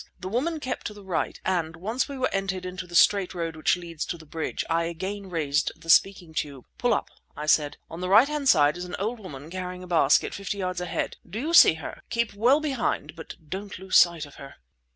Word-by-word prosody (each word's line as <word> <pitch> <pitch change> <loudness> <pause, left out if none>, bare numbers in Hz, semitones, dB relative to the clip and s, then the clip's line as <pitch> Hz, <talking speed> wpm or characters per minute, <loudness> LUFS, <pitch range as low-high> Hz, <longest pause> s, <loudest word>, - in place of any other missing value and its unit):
The 185 - -5
woman 305 - -1
kept 260 -3 -4
to 210 - -8
the 205 - -12
right, 185 -3 -2
and, 165 -4 0
once 220 - -2
we 280 - -6
were 255 0 -1
entered 195 -1 -2
into 180 0 -6
the 175 - -8
straight 190 +1 +4
road 165 -2 -3
which 155 +3 +2
leads 170 -3 -6
to 170 - -4
the 160 - -14
bridge, 160 +1 -4
I 165 0 +1
again 190 +4 -5
raised 150 -4 0
the 165 0 +1
speaking 180 -3 +3
tube. 140 -4 -4
"Pull 245 - +2
up," - - 0 0.3
I 150 - -4
said. 150 -1 +2
"On 165 +2 -8
the 180 - -2
right 220 +7 +7
hand 295 -2 0
side 145 +2 +5
is 175 - -5
an 180 - -5
old 220 +5 -2
woman 155 -6 -9
carrying 180 0 -5
a - - -9
basket, 160 -5 +3
fifty 200 0 -4
yards 185 -2 -2
ahead. 180 - -3
Do 210 +5 -5
you 315 +6 -2
see 250 - +8
her? 160 - -8
Keep 235 -2 -1
well 240 +8 +4
behind, 265 - -2
but 165 - -9
don't 195 +4 -6
lose 190 +1 -3
sight 170 -3 +5
of 145 - -15
her." 140 - -10
180 Hz, 235 wpm, -26 LUFS, 165-205 Hz, 0.3 s, see